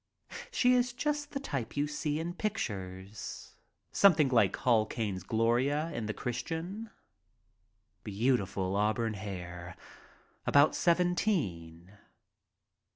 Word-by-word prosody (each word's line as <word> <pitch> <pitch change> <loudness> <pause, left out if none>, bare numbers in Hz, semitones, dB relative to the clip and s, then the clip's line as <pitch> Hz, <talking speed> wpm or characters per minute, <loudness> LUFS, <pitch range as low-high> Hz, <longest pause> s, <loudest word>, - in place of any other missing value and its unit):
She 250 0 +3
is 245 -1 +2
just 295 +3 -2
the 280 - -4
type 140 - -4
you 145 - +2
see 150 0 -2
in 170 +2 -3
pictures, 100 - -5 0.4
something 155 -8 +5
like 115 -6 +3
Hall 115 -4 +3
Caine's 105 -5 -3
Gloria 120 - +1
in 115 -2 -3
The 110 - -2
Christian 170 - -4 0.6
— 105 +3 -45
beautiful 100 -4 0
auburn 110 +2 +1
hair, 90 -3 -7 0.7
about 145 +2 +5
seventeen. 105 - 0
120 Hz, 105 wpm, -31 LUFS, -, 0.7 s, something